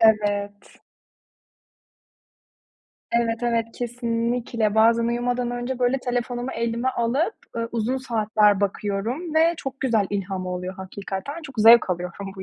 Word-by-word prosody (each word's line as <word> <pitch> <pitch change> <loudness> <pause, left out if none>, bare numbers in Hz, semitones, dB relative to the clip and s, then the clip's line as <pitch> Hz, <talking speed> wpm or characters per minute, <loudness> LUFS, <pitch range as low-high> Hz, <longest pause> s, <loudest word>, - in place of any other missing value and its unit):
Evet. 205 -2 +1 2.3
Evet, 235 0 0
evet, 230 -1 +1
kesinlikle. 235 -2 -1
Bazen 230 +1 +4
uyumadan 245 +1 -1
önce 245 +1 -3
böyle 250 +2 +2
telefonumu 245 0 -2
elime 235 +2 -1
alıp, 260 - 0 0.2
ııı, 230 0 -2
uzun 235 +3 0
saatler 215 -5 +2
bakıyorum 210 - -2
ve 325 +2 +4
çok 270 -2 -6
güzel 225 -6 +2
ilham 190 -2 -3
oluyor 180 +1 -4
hakikaten. 190 +6 -6
Çok 275 -4 -10
zevk 225 -1 +7
alıyorum 180 +2 -4
bu 190 - -6
230 Hz, 120 wpm, -24 LUFS, 205-245 Hz, 2.3 s, zevk